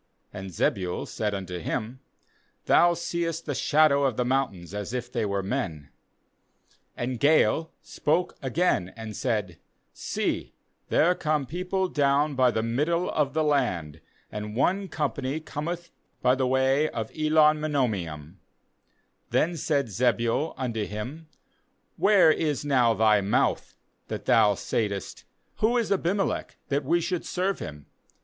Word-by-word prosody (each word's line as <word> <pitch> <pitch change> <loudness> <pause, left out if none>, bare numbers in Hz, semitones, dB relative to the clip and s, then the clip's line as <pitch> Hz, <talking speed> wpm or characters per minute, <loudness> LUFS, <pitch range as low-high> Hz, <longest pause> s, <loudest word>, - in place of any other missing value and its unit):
And 95 -2 -6
Zebul 90 +1 -1
said 105 -2 -2
unto 90 -2 -5
him: 120 +8 -4 0.3
* - - -40
Thou 175 0 +5
seest 165 -1 -3
the 145 - -2
shadow 145 +1 +3
of 130 -5 0
the 125 - +1
mountains 110 -9 -1
as 105 +2 -5
if 125 0 -4
they 115 -4 -1
were 100 -1 -1
men/ 90 - -3 1.1
37And 125 0 -3
Gaal 160 +3 +3
spoke 160 +2 -1
again 130 - 0
and 110 -2 -7
said: 105 -9 -2 0.2
' - - -47
See, - - -3 0.3
there 175 +3 +4
come 155 -5 -1
people 185 +5 -2
down 145 -1 +2
by 130 -2 +4
the 110 -2 -1
middle 150 +10 0
of 150 -2 0
the 160 - +2
land, 95 - 0 0.3
and 105 0 -5
one 190 +10 +1
company 145 -3 -2
cometh 170 +3 -5 0.3
by 125 - +5
the 130 -1 0
way 135 +3 +2
of 110 -2 -5
Elon 155 0 +4
meonenim/ 100 - -2 0.9
38Then 170 +2 +2
said 140 -2 +1
Zebul 120 - 0
unto 120 -5 -2
him: 125 +10 -6 0.7
'Where 195 -5 +5
is 150 -3 -1
now 125 -5 +3
thy 110 -2 +4
mouth, 100 +1 0 0.3
that - - -5
thou 105 -3 +4
saidst: 100 -1 -3 0.3
Who 235 +3 +2
is 230 -3 0
Abimelech, 195 +1 -1
that 140 +1 0
we 170 +5 +2
should 180 +1 -2
serve 190 +2 -1
him? 75 -1 -8
135 Hz, 140 wpm, -26 LUFS, 105-155 Hz, 1.1 s, Thou